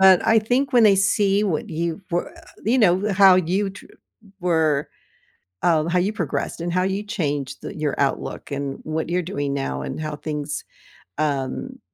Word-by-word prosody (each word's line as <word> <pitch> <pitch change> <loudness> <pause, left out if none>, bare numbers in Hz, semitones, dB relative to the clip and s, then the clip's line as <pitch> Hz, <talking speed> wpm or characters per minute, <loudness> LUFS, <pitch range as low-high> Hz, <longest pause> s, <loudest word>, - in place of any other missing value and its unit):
But 190 -2 +7
I 225 -1 +5
think 255 +5 0
when 240 -2 +6
they 200 -2 +6
see 200 +1 +2
what 170 -7 -2
you 165 +2 -2
we 175 - +1 0.5
you 260 - +4
know, 200 0 +3
how 190 -1 +7
you 185 +3 +1
tr 200 - -13 0.5
were, 160 -5 +1 0.7
um, 160 -2 +3
how 180 +1 +2
you 200 +4 0
progressed 170 -3 -3
and 175 0 -2
how 185 +1 +2
you 195 +2 -1
changed 145 - -3
the - - -7
your 150 -2 -1
outlook 140 0 -2
and 140 -1 -3
what 160 +1 -3
you're 180 +1 +1
doing 145 -5 -3
now 65 - -2
and 65 - -5
how 155 -1 -3
things, 150 -1 -4 0.6
um 140 -4 -2
175 Hz, 175 wpm, -22 LUFS, 150-195 Hz, 0.7 s, But